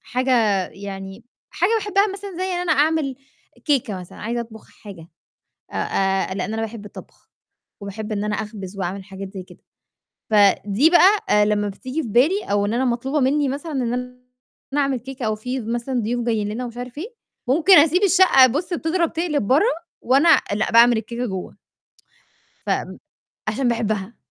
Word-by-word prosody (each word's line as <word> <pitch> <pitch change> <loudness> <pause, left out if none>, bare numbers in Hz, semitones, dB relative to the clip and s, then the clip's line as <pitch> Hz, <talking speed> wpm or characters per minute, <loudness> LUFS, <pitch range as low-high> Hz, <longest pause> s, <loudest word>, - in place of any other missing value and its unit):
حاجة 255 +1 -1 0.4
يعني، 195 +1 -9 0.3
حاجة 355 +6 0
باحبها 410 -1 +1
مثلًا 400 +1 -7
زي 370 - -1
إن 365 -2 -2
أنا 355 -3 +1
أعمل 300 -2 +1 0.5
كيكة 235 - 0
مثلًا، 180 - -12
عايزة 235 +2 -3
أطبخ 225 -2 -10
حاجة، 185 -6 -12 0.6
آآ - - -9 0.6
آآ - - -1
لإن 195 +2 -3
أنا 225 - -2
باحب 225 -1 -6
الطبخ، 205 - -13 0.5
وباحب 210 +2 -6
إن 205 -1 -2
أنا 210 0 -1
أخبز 205 -3 -7
وأعمل 190 +2 -3
حاجات 195 0 -9
زي 190 -2 -6
كده، - - -17 0.7
فدي 205 +6 +4
بقى 355 - +4
لمّا 205 -1 0
بتيجي 255 +10 -5
في 235 - -6
بالي 290 - +2
أو 205 0 0
إن 210 - -2
أنا 255 +2 +1
مطلوبة 260 +4 -1
مني 280 +2 +2
مثلًا 285 +4 -5
إن 245 -4 -1
أنا 250 0 -5 0.6
أعمل 275 -2 0
كيكة 255 0 -6
أو 215 - 0
في 250 +4 -4
مثلًا 240 +3 -2
ضيوف 240 +2 -2
جايين 215 -3 0
لنا 225 +4 -4
ومش 240 -1 -8
عارف 245 +2 -7
إيه، 430 +10 -7 0.3
ممكن 335 +8 +6
أسيب 330 +5 +4
الشقة 370 -9 +6
بّصّ 300 +9 -2
بتضرب 335 +1 -1
تقلب 315 - -1
برّه، 290 - +4 0.4
وأنا 275 +7 +3 0.3
لأ 215 +3 -1
باعمل 235 +1 +6
الكيكة 235 +2 -4
جوّه. 190 -4 -6 1.1
ف - - -5
م - - -2 0.5
عشان 255 +3 0
باحبها. 220 -3 -2
240 Hz, 170 wpm, -21 LUFS, 210-295 Hz, 1.1 s, ممكن